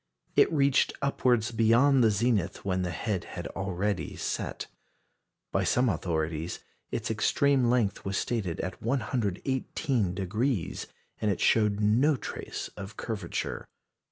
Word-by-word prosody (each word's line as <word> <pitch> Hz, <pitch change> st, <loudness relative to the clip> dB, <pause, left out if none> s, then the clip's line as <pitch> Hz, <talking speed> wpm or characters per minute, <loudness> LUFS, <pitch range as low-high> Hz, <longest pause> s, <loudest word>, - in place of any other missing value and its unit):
It -, -, +5 dB
reached 140 Hz, -3 st, +3 dB
upwards 125 Hz, -5 st, +2 dB
beyond 120 Hz, +4 st, +4 dB
the 110 Hz, -, +6 dB
zenith 105 Hz, -4 st, 0 dB
when 95 Hz, -1 st, 0 dB
the 90 Hz, -, -1 dB
head 95 Hz, 0 st, -2 dB
had -, -, -7 dB
already 95 Hz, +1 st, -2 dB
set. -, -, -3 dB, 0.9 s
By -, -, +1 dB
some 125 Hz, 0 st, +3 dB
authorities 80 Hz, -2 st, -2 dB, 0.3 s
its -, -, -2 dB
extreme 140 Hz, -4 st, +3 dB
length 120 Hz, -5 st, +1 dB
was 95 Hz, 0 st, -2 dB
stated 100 Hz, -9 st, -2 dB
at 95 Hz, -, -5 dB
118°, 110 Hz, -, -1 dB, 0.3 s
and 105 Hz, -, +2 dB
it 100 Hz, -, 0 dB
showed 105 Hz, -2 st, +3 dB
no 120 Hz, +9 st, +4 dB
trace -, -, -5 dB
of 100 Hz, +2 st, -8 dB
curvature. 105 Hz, -7 st, -4 dB
105 Hz, 125 wpm, -29 LUFS, 95-125 Hz, 0.9 s, the